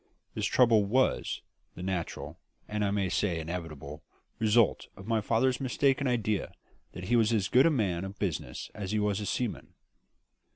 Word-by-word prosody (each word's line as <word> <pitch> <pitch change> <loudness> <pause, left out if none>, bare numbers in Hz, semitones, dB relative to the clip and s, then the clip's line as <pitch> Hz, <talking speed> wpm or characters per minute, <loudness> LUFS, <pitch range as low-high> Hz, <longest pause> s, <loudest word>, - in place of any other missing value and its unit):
This - - -1
trouble 115 -4 +5
was 130 +6 +1 0.3
the 90 - -7
natural 90 -3 -4 0.3
and 105 0 -2
I 100 - +1
may 100 -1 0
say 90 -1 0
inevitable 80 -3 -6 0.4
result 110 0 +3
of 95 - -10
my 110 0 +1
father's 125 +5 +1
mistaken 135 +1 +1
idea 110 -4 0 0.4
that 90 - -7
he 120 +6 +1
was 115 -1 +4
as 105 -4 +1
good 130 +5 +6
a - - +5
man 100 - 0
of 95 +1 -7
business 90 -7 -3
as 105 -1 -5
he - - +2
was 105 -1 0
a 105 - -4
seaman. 120 -4 -3
105 Hz, 170 wpm, -29 LUFS, 95-120 Hz, 0.4 s, good